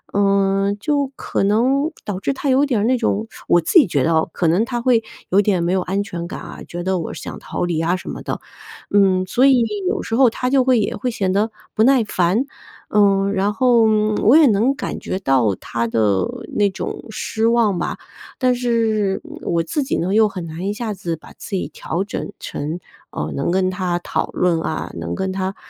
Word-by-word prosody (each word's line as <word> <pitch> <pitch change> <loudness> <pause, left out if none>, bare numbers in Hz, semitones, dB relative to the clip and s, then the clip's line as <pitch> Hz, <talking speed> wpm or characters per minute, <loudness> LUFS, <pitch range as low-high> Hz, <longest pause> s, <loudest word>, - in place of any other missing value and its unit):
嗯， 195 0 +2
就 285 +2 0
可 - - -2
能 260 - +2
导 200 -3 -3
致 235 - -1
他 275 +1 -4
有 265 +2 +4
点 250 -8 +1
儿 - - 0
那 255 - +3
种 225 -2 -1 0.2
我 175 - +5
自 170 - +5
己 280 - +4
觉 145 -5 +1
得 165 - +2
哦， 160 +1 +1
可 170 - 0
能 175 +7 +3
他 240 -1 -3
会 235 -2 +3 0.3
有 195 +3 +4
点 190 -4 +1
没 175 +2 +1
有 190 - +2
安 195 +3 -1
全 170 -3 -6
感 - - -6
啊， - - -9
觉 175 0 -5
得 185 0 0
我 165 - -4
想 - - -7
逃 - - -4
离 170 -2 -1
啊 170 +2 +1
什 185 - -8
么 - - -7
的。 - - -4 0.5
嗯， 190 -2 +3
所 255 +8 +3
以 255 -3 +5 0.3
有 410 0 -2
时 225 - -2
候 255 -1 +6
他 250 +2 -3
就 270 -2 +4
会 250 -2 +3
也 205 - -1
会 255 - -2
显 200 -6 -1
得 210 +3 +1 0.2
不 220 - 0
耐 255 -1 +5
烦。 190 +5 +1 0.4
呃， 200 -1 +3
然 200 +1 +1
后， 240 0 +4 0.4
我 250 +9 +6
也 320 - +7
能 235 +3 +3
感 295 - -4
觉 185 - -3
到 130 - +2
他 115 0 -3
的 105 -4 +1 0.3
那 205 -1 +3
种 195 - -6
失 220 +1 -1
望 225 -6 +2
吧。 - - -3 0.4
但 255 -1 +2
是 225 -5 0 0.2
我 170 -1 0
自 290 - -2
己 270 - -1
呢， 185 +3 -1
又 215 0 +4
很 180 -3 -6
难 165 +4 -5
一 - - 0
下 220 -1 -4
子 170 -3 -4
把 160 - -15
自 - - -11
己 - - -2
调 175 +4 -3
整 205 - -5
成， 155 +5 -5 0.3
呃， 75 +1 -4
能 140 - -1
跟 185 +1 +1
他 180 -2 -1
讨 175 - -2
论 170 -3 +1
啊、 155 - -3
能 85 0 -4
跟 190 0 -2
他 190 +1 -3
200 Hz, 235 characters per minute, -20 LUFS, 175-235 Hz, 0.5 s, 也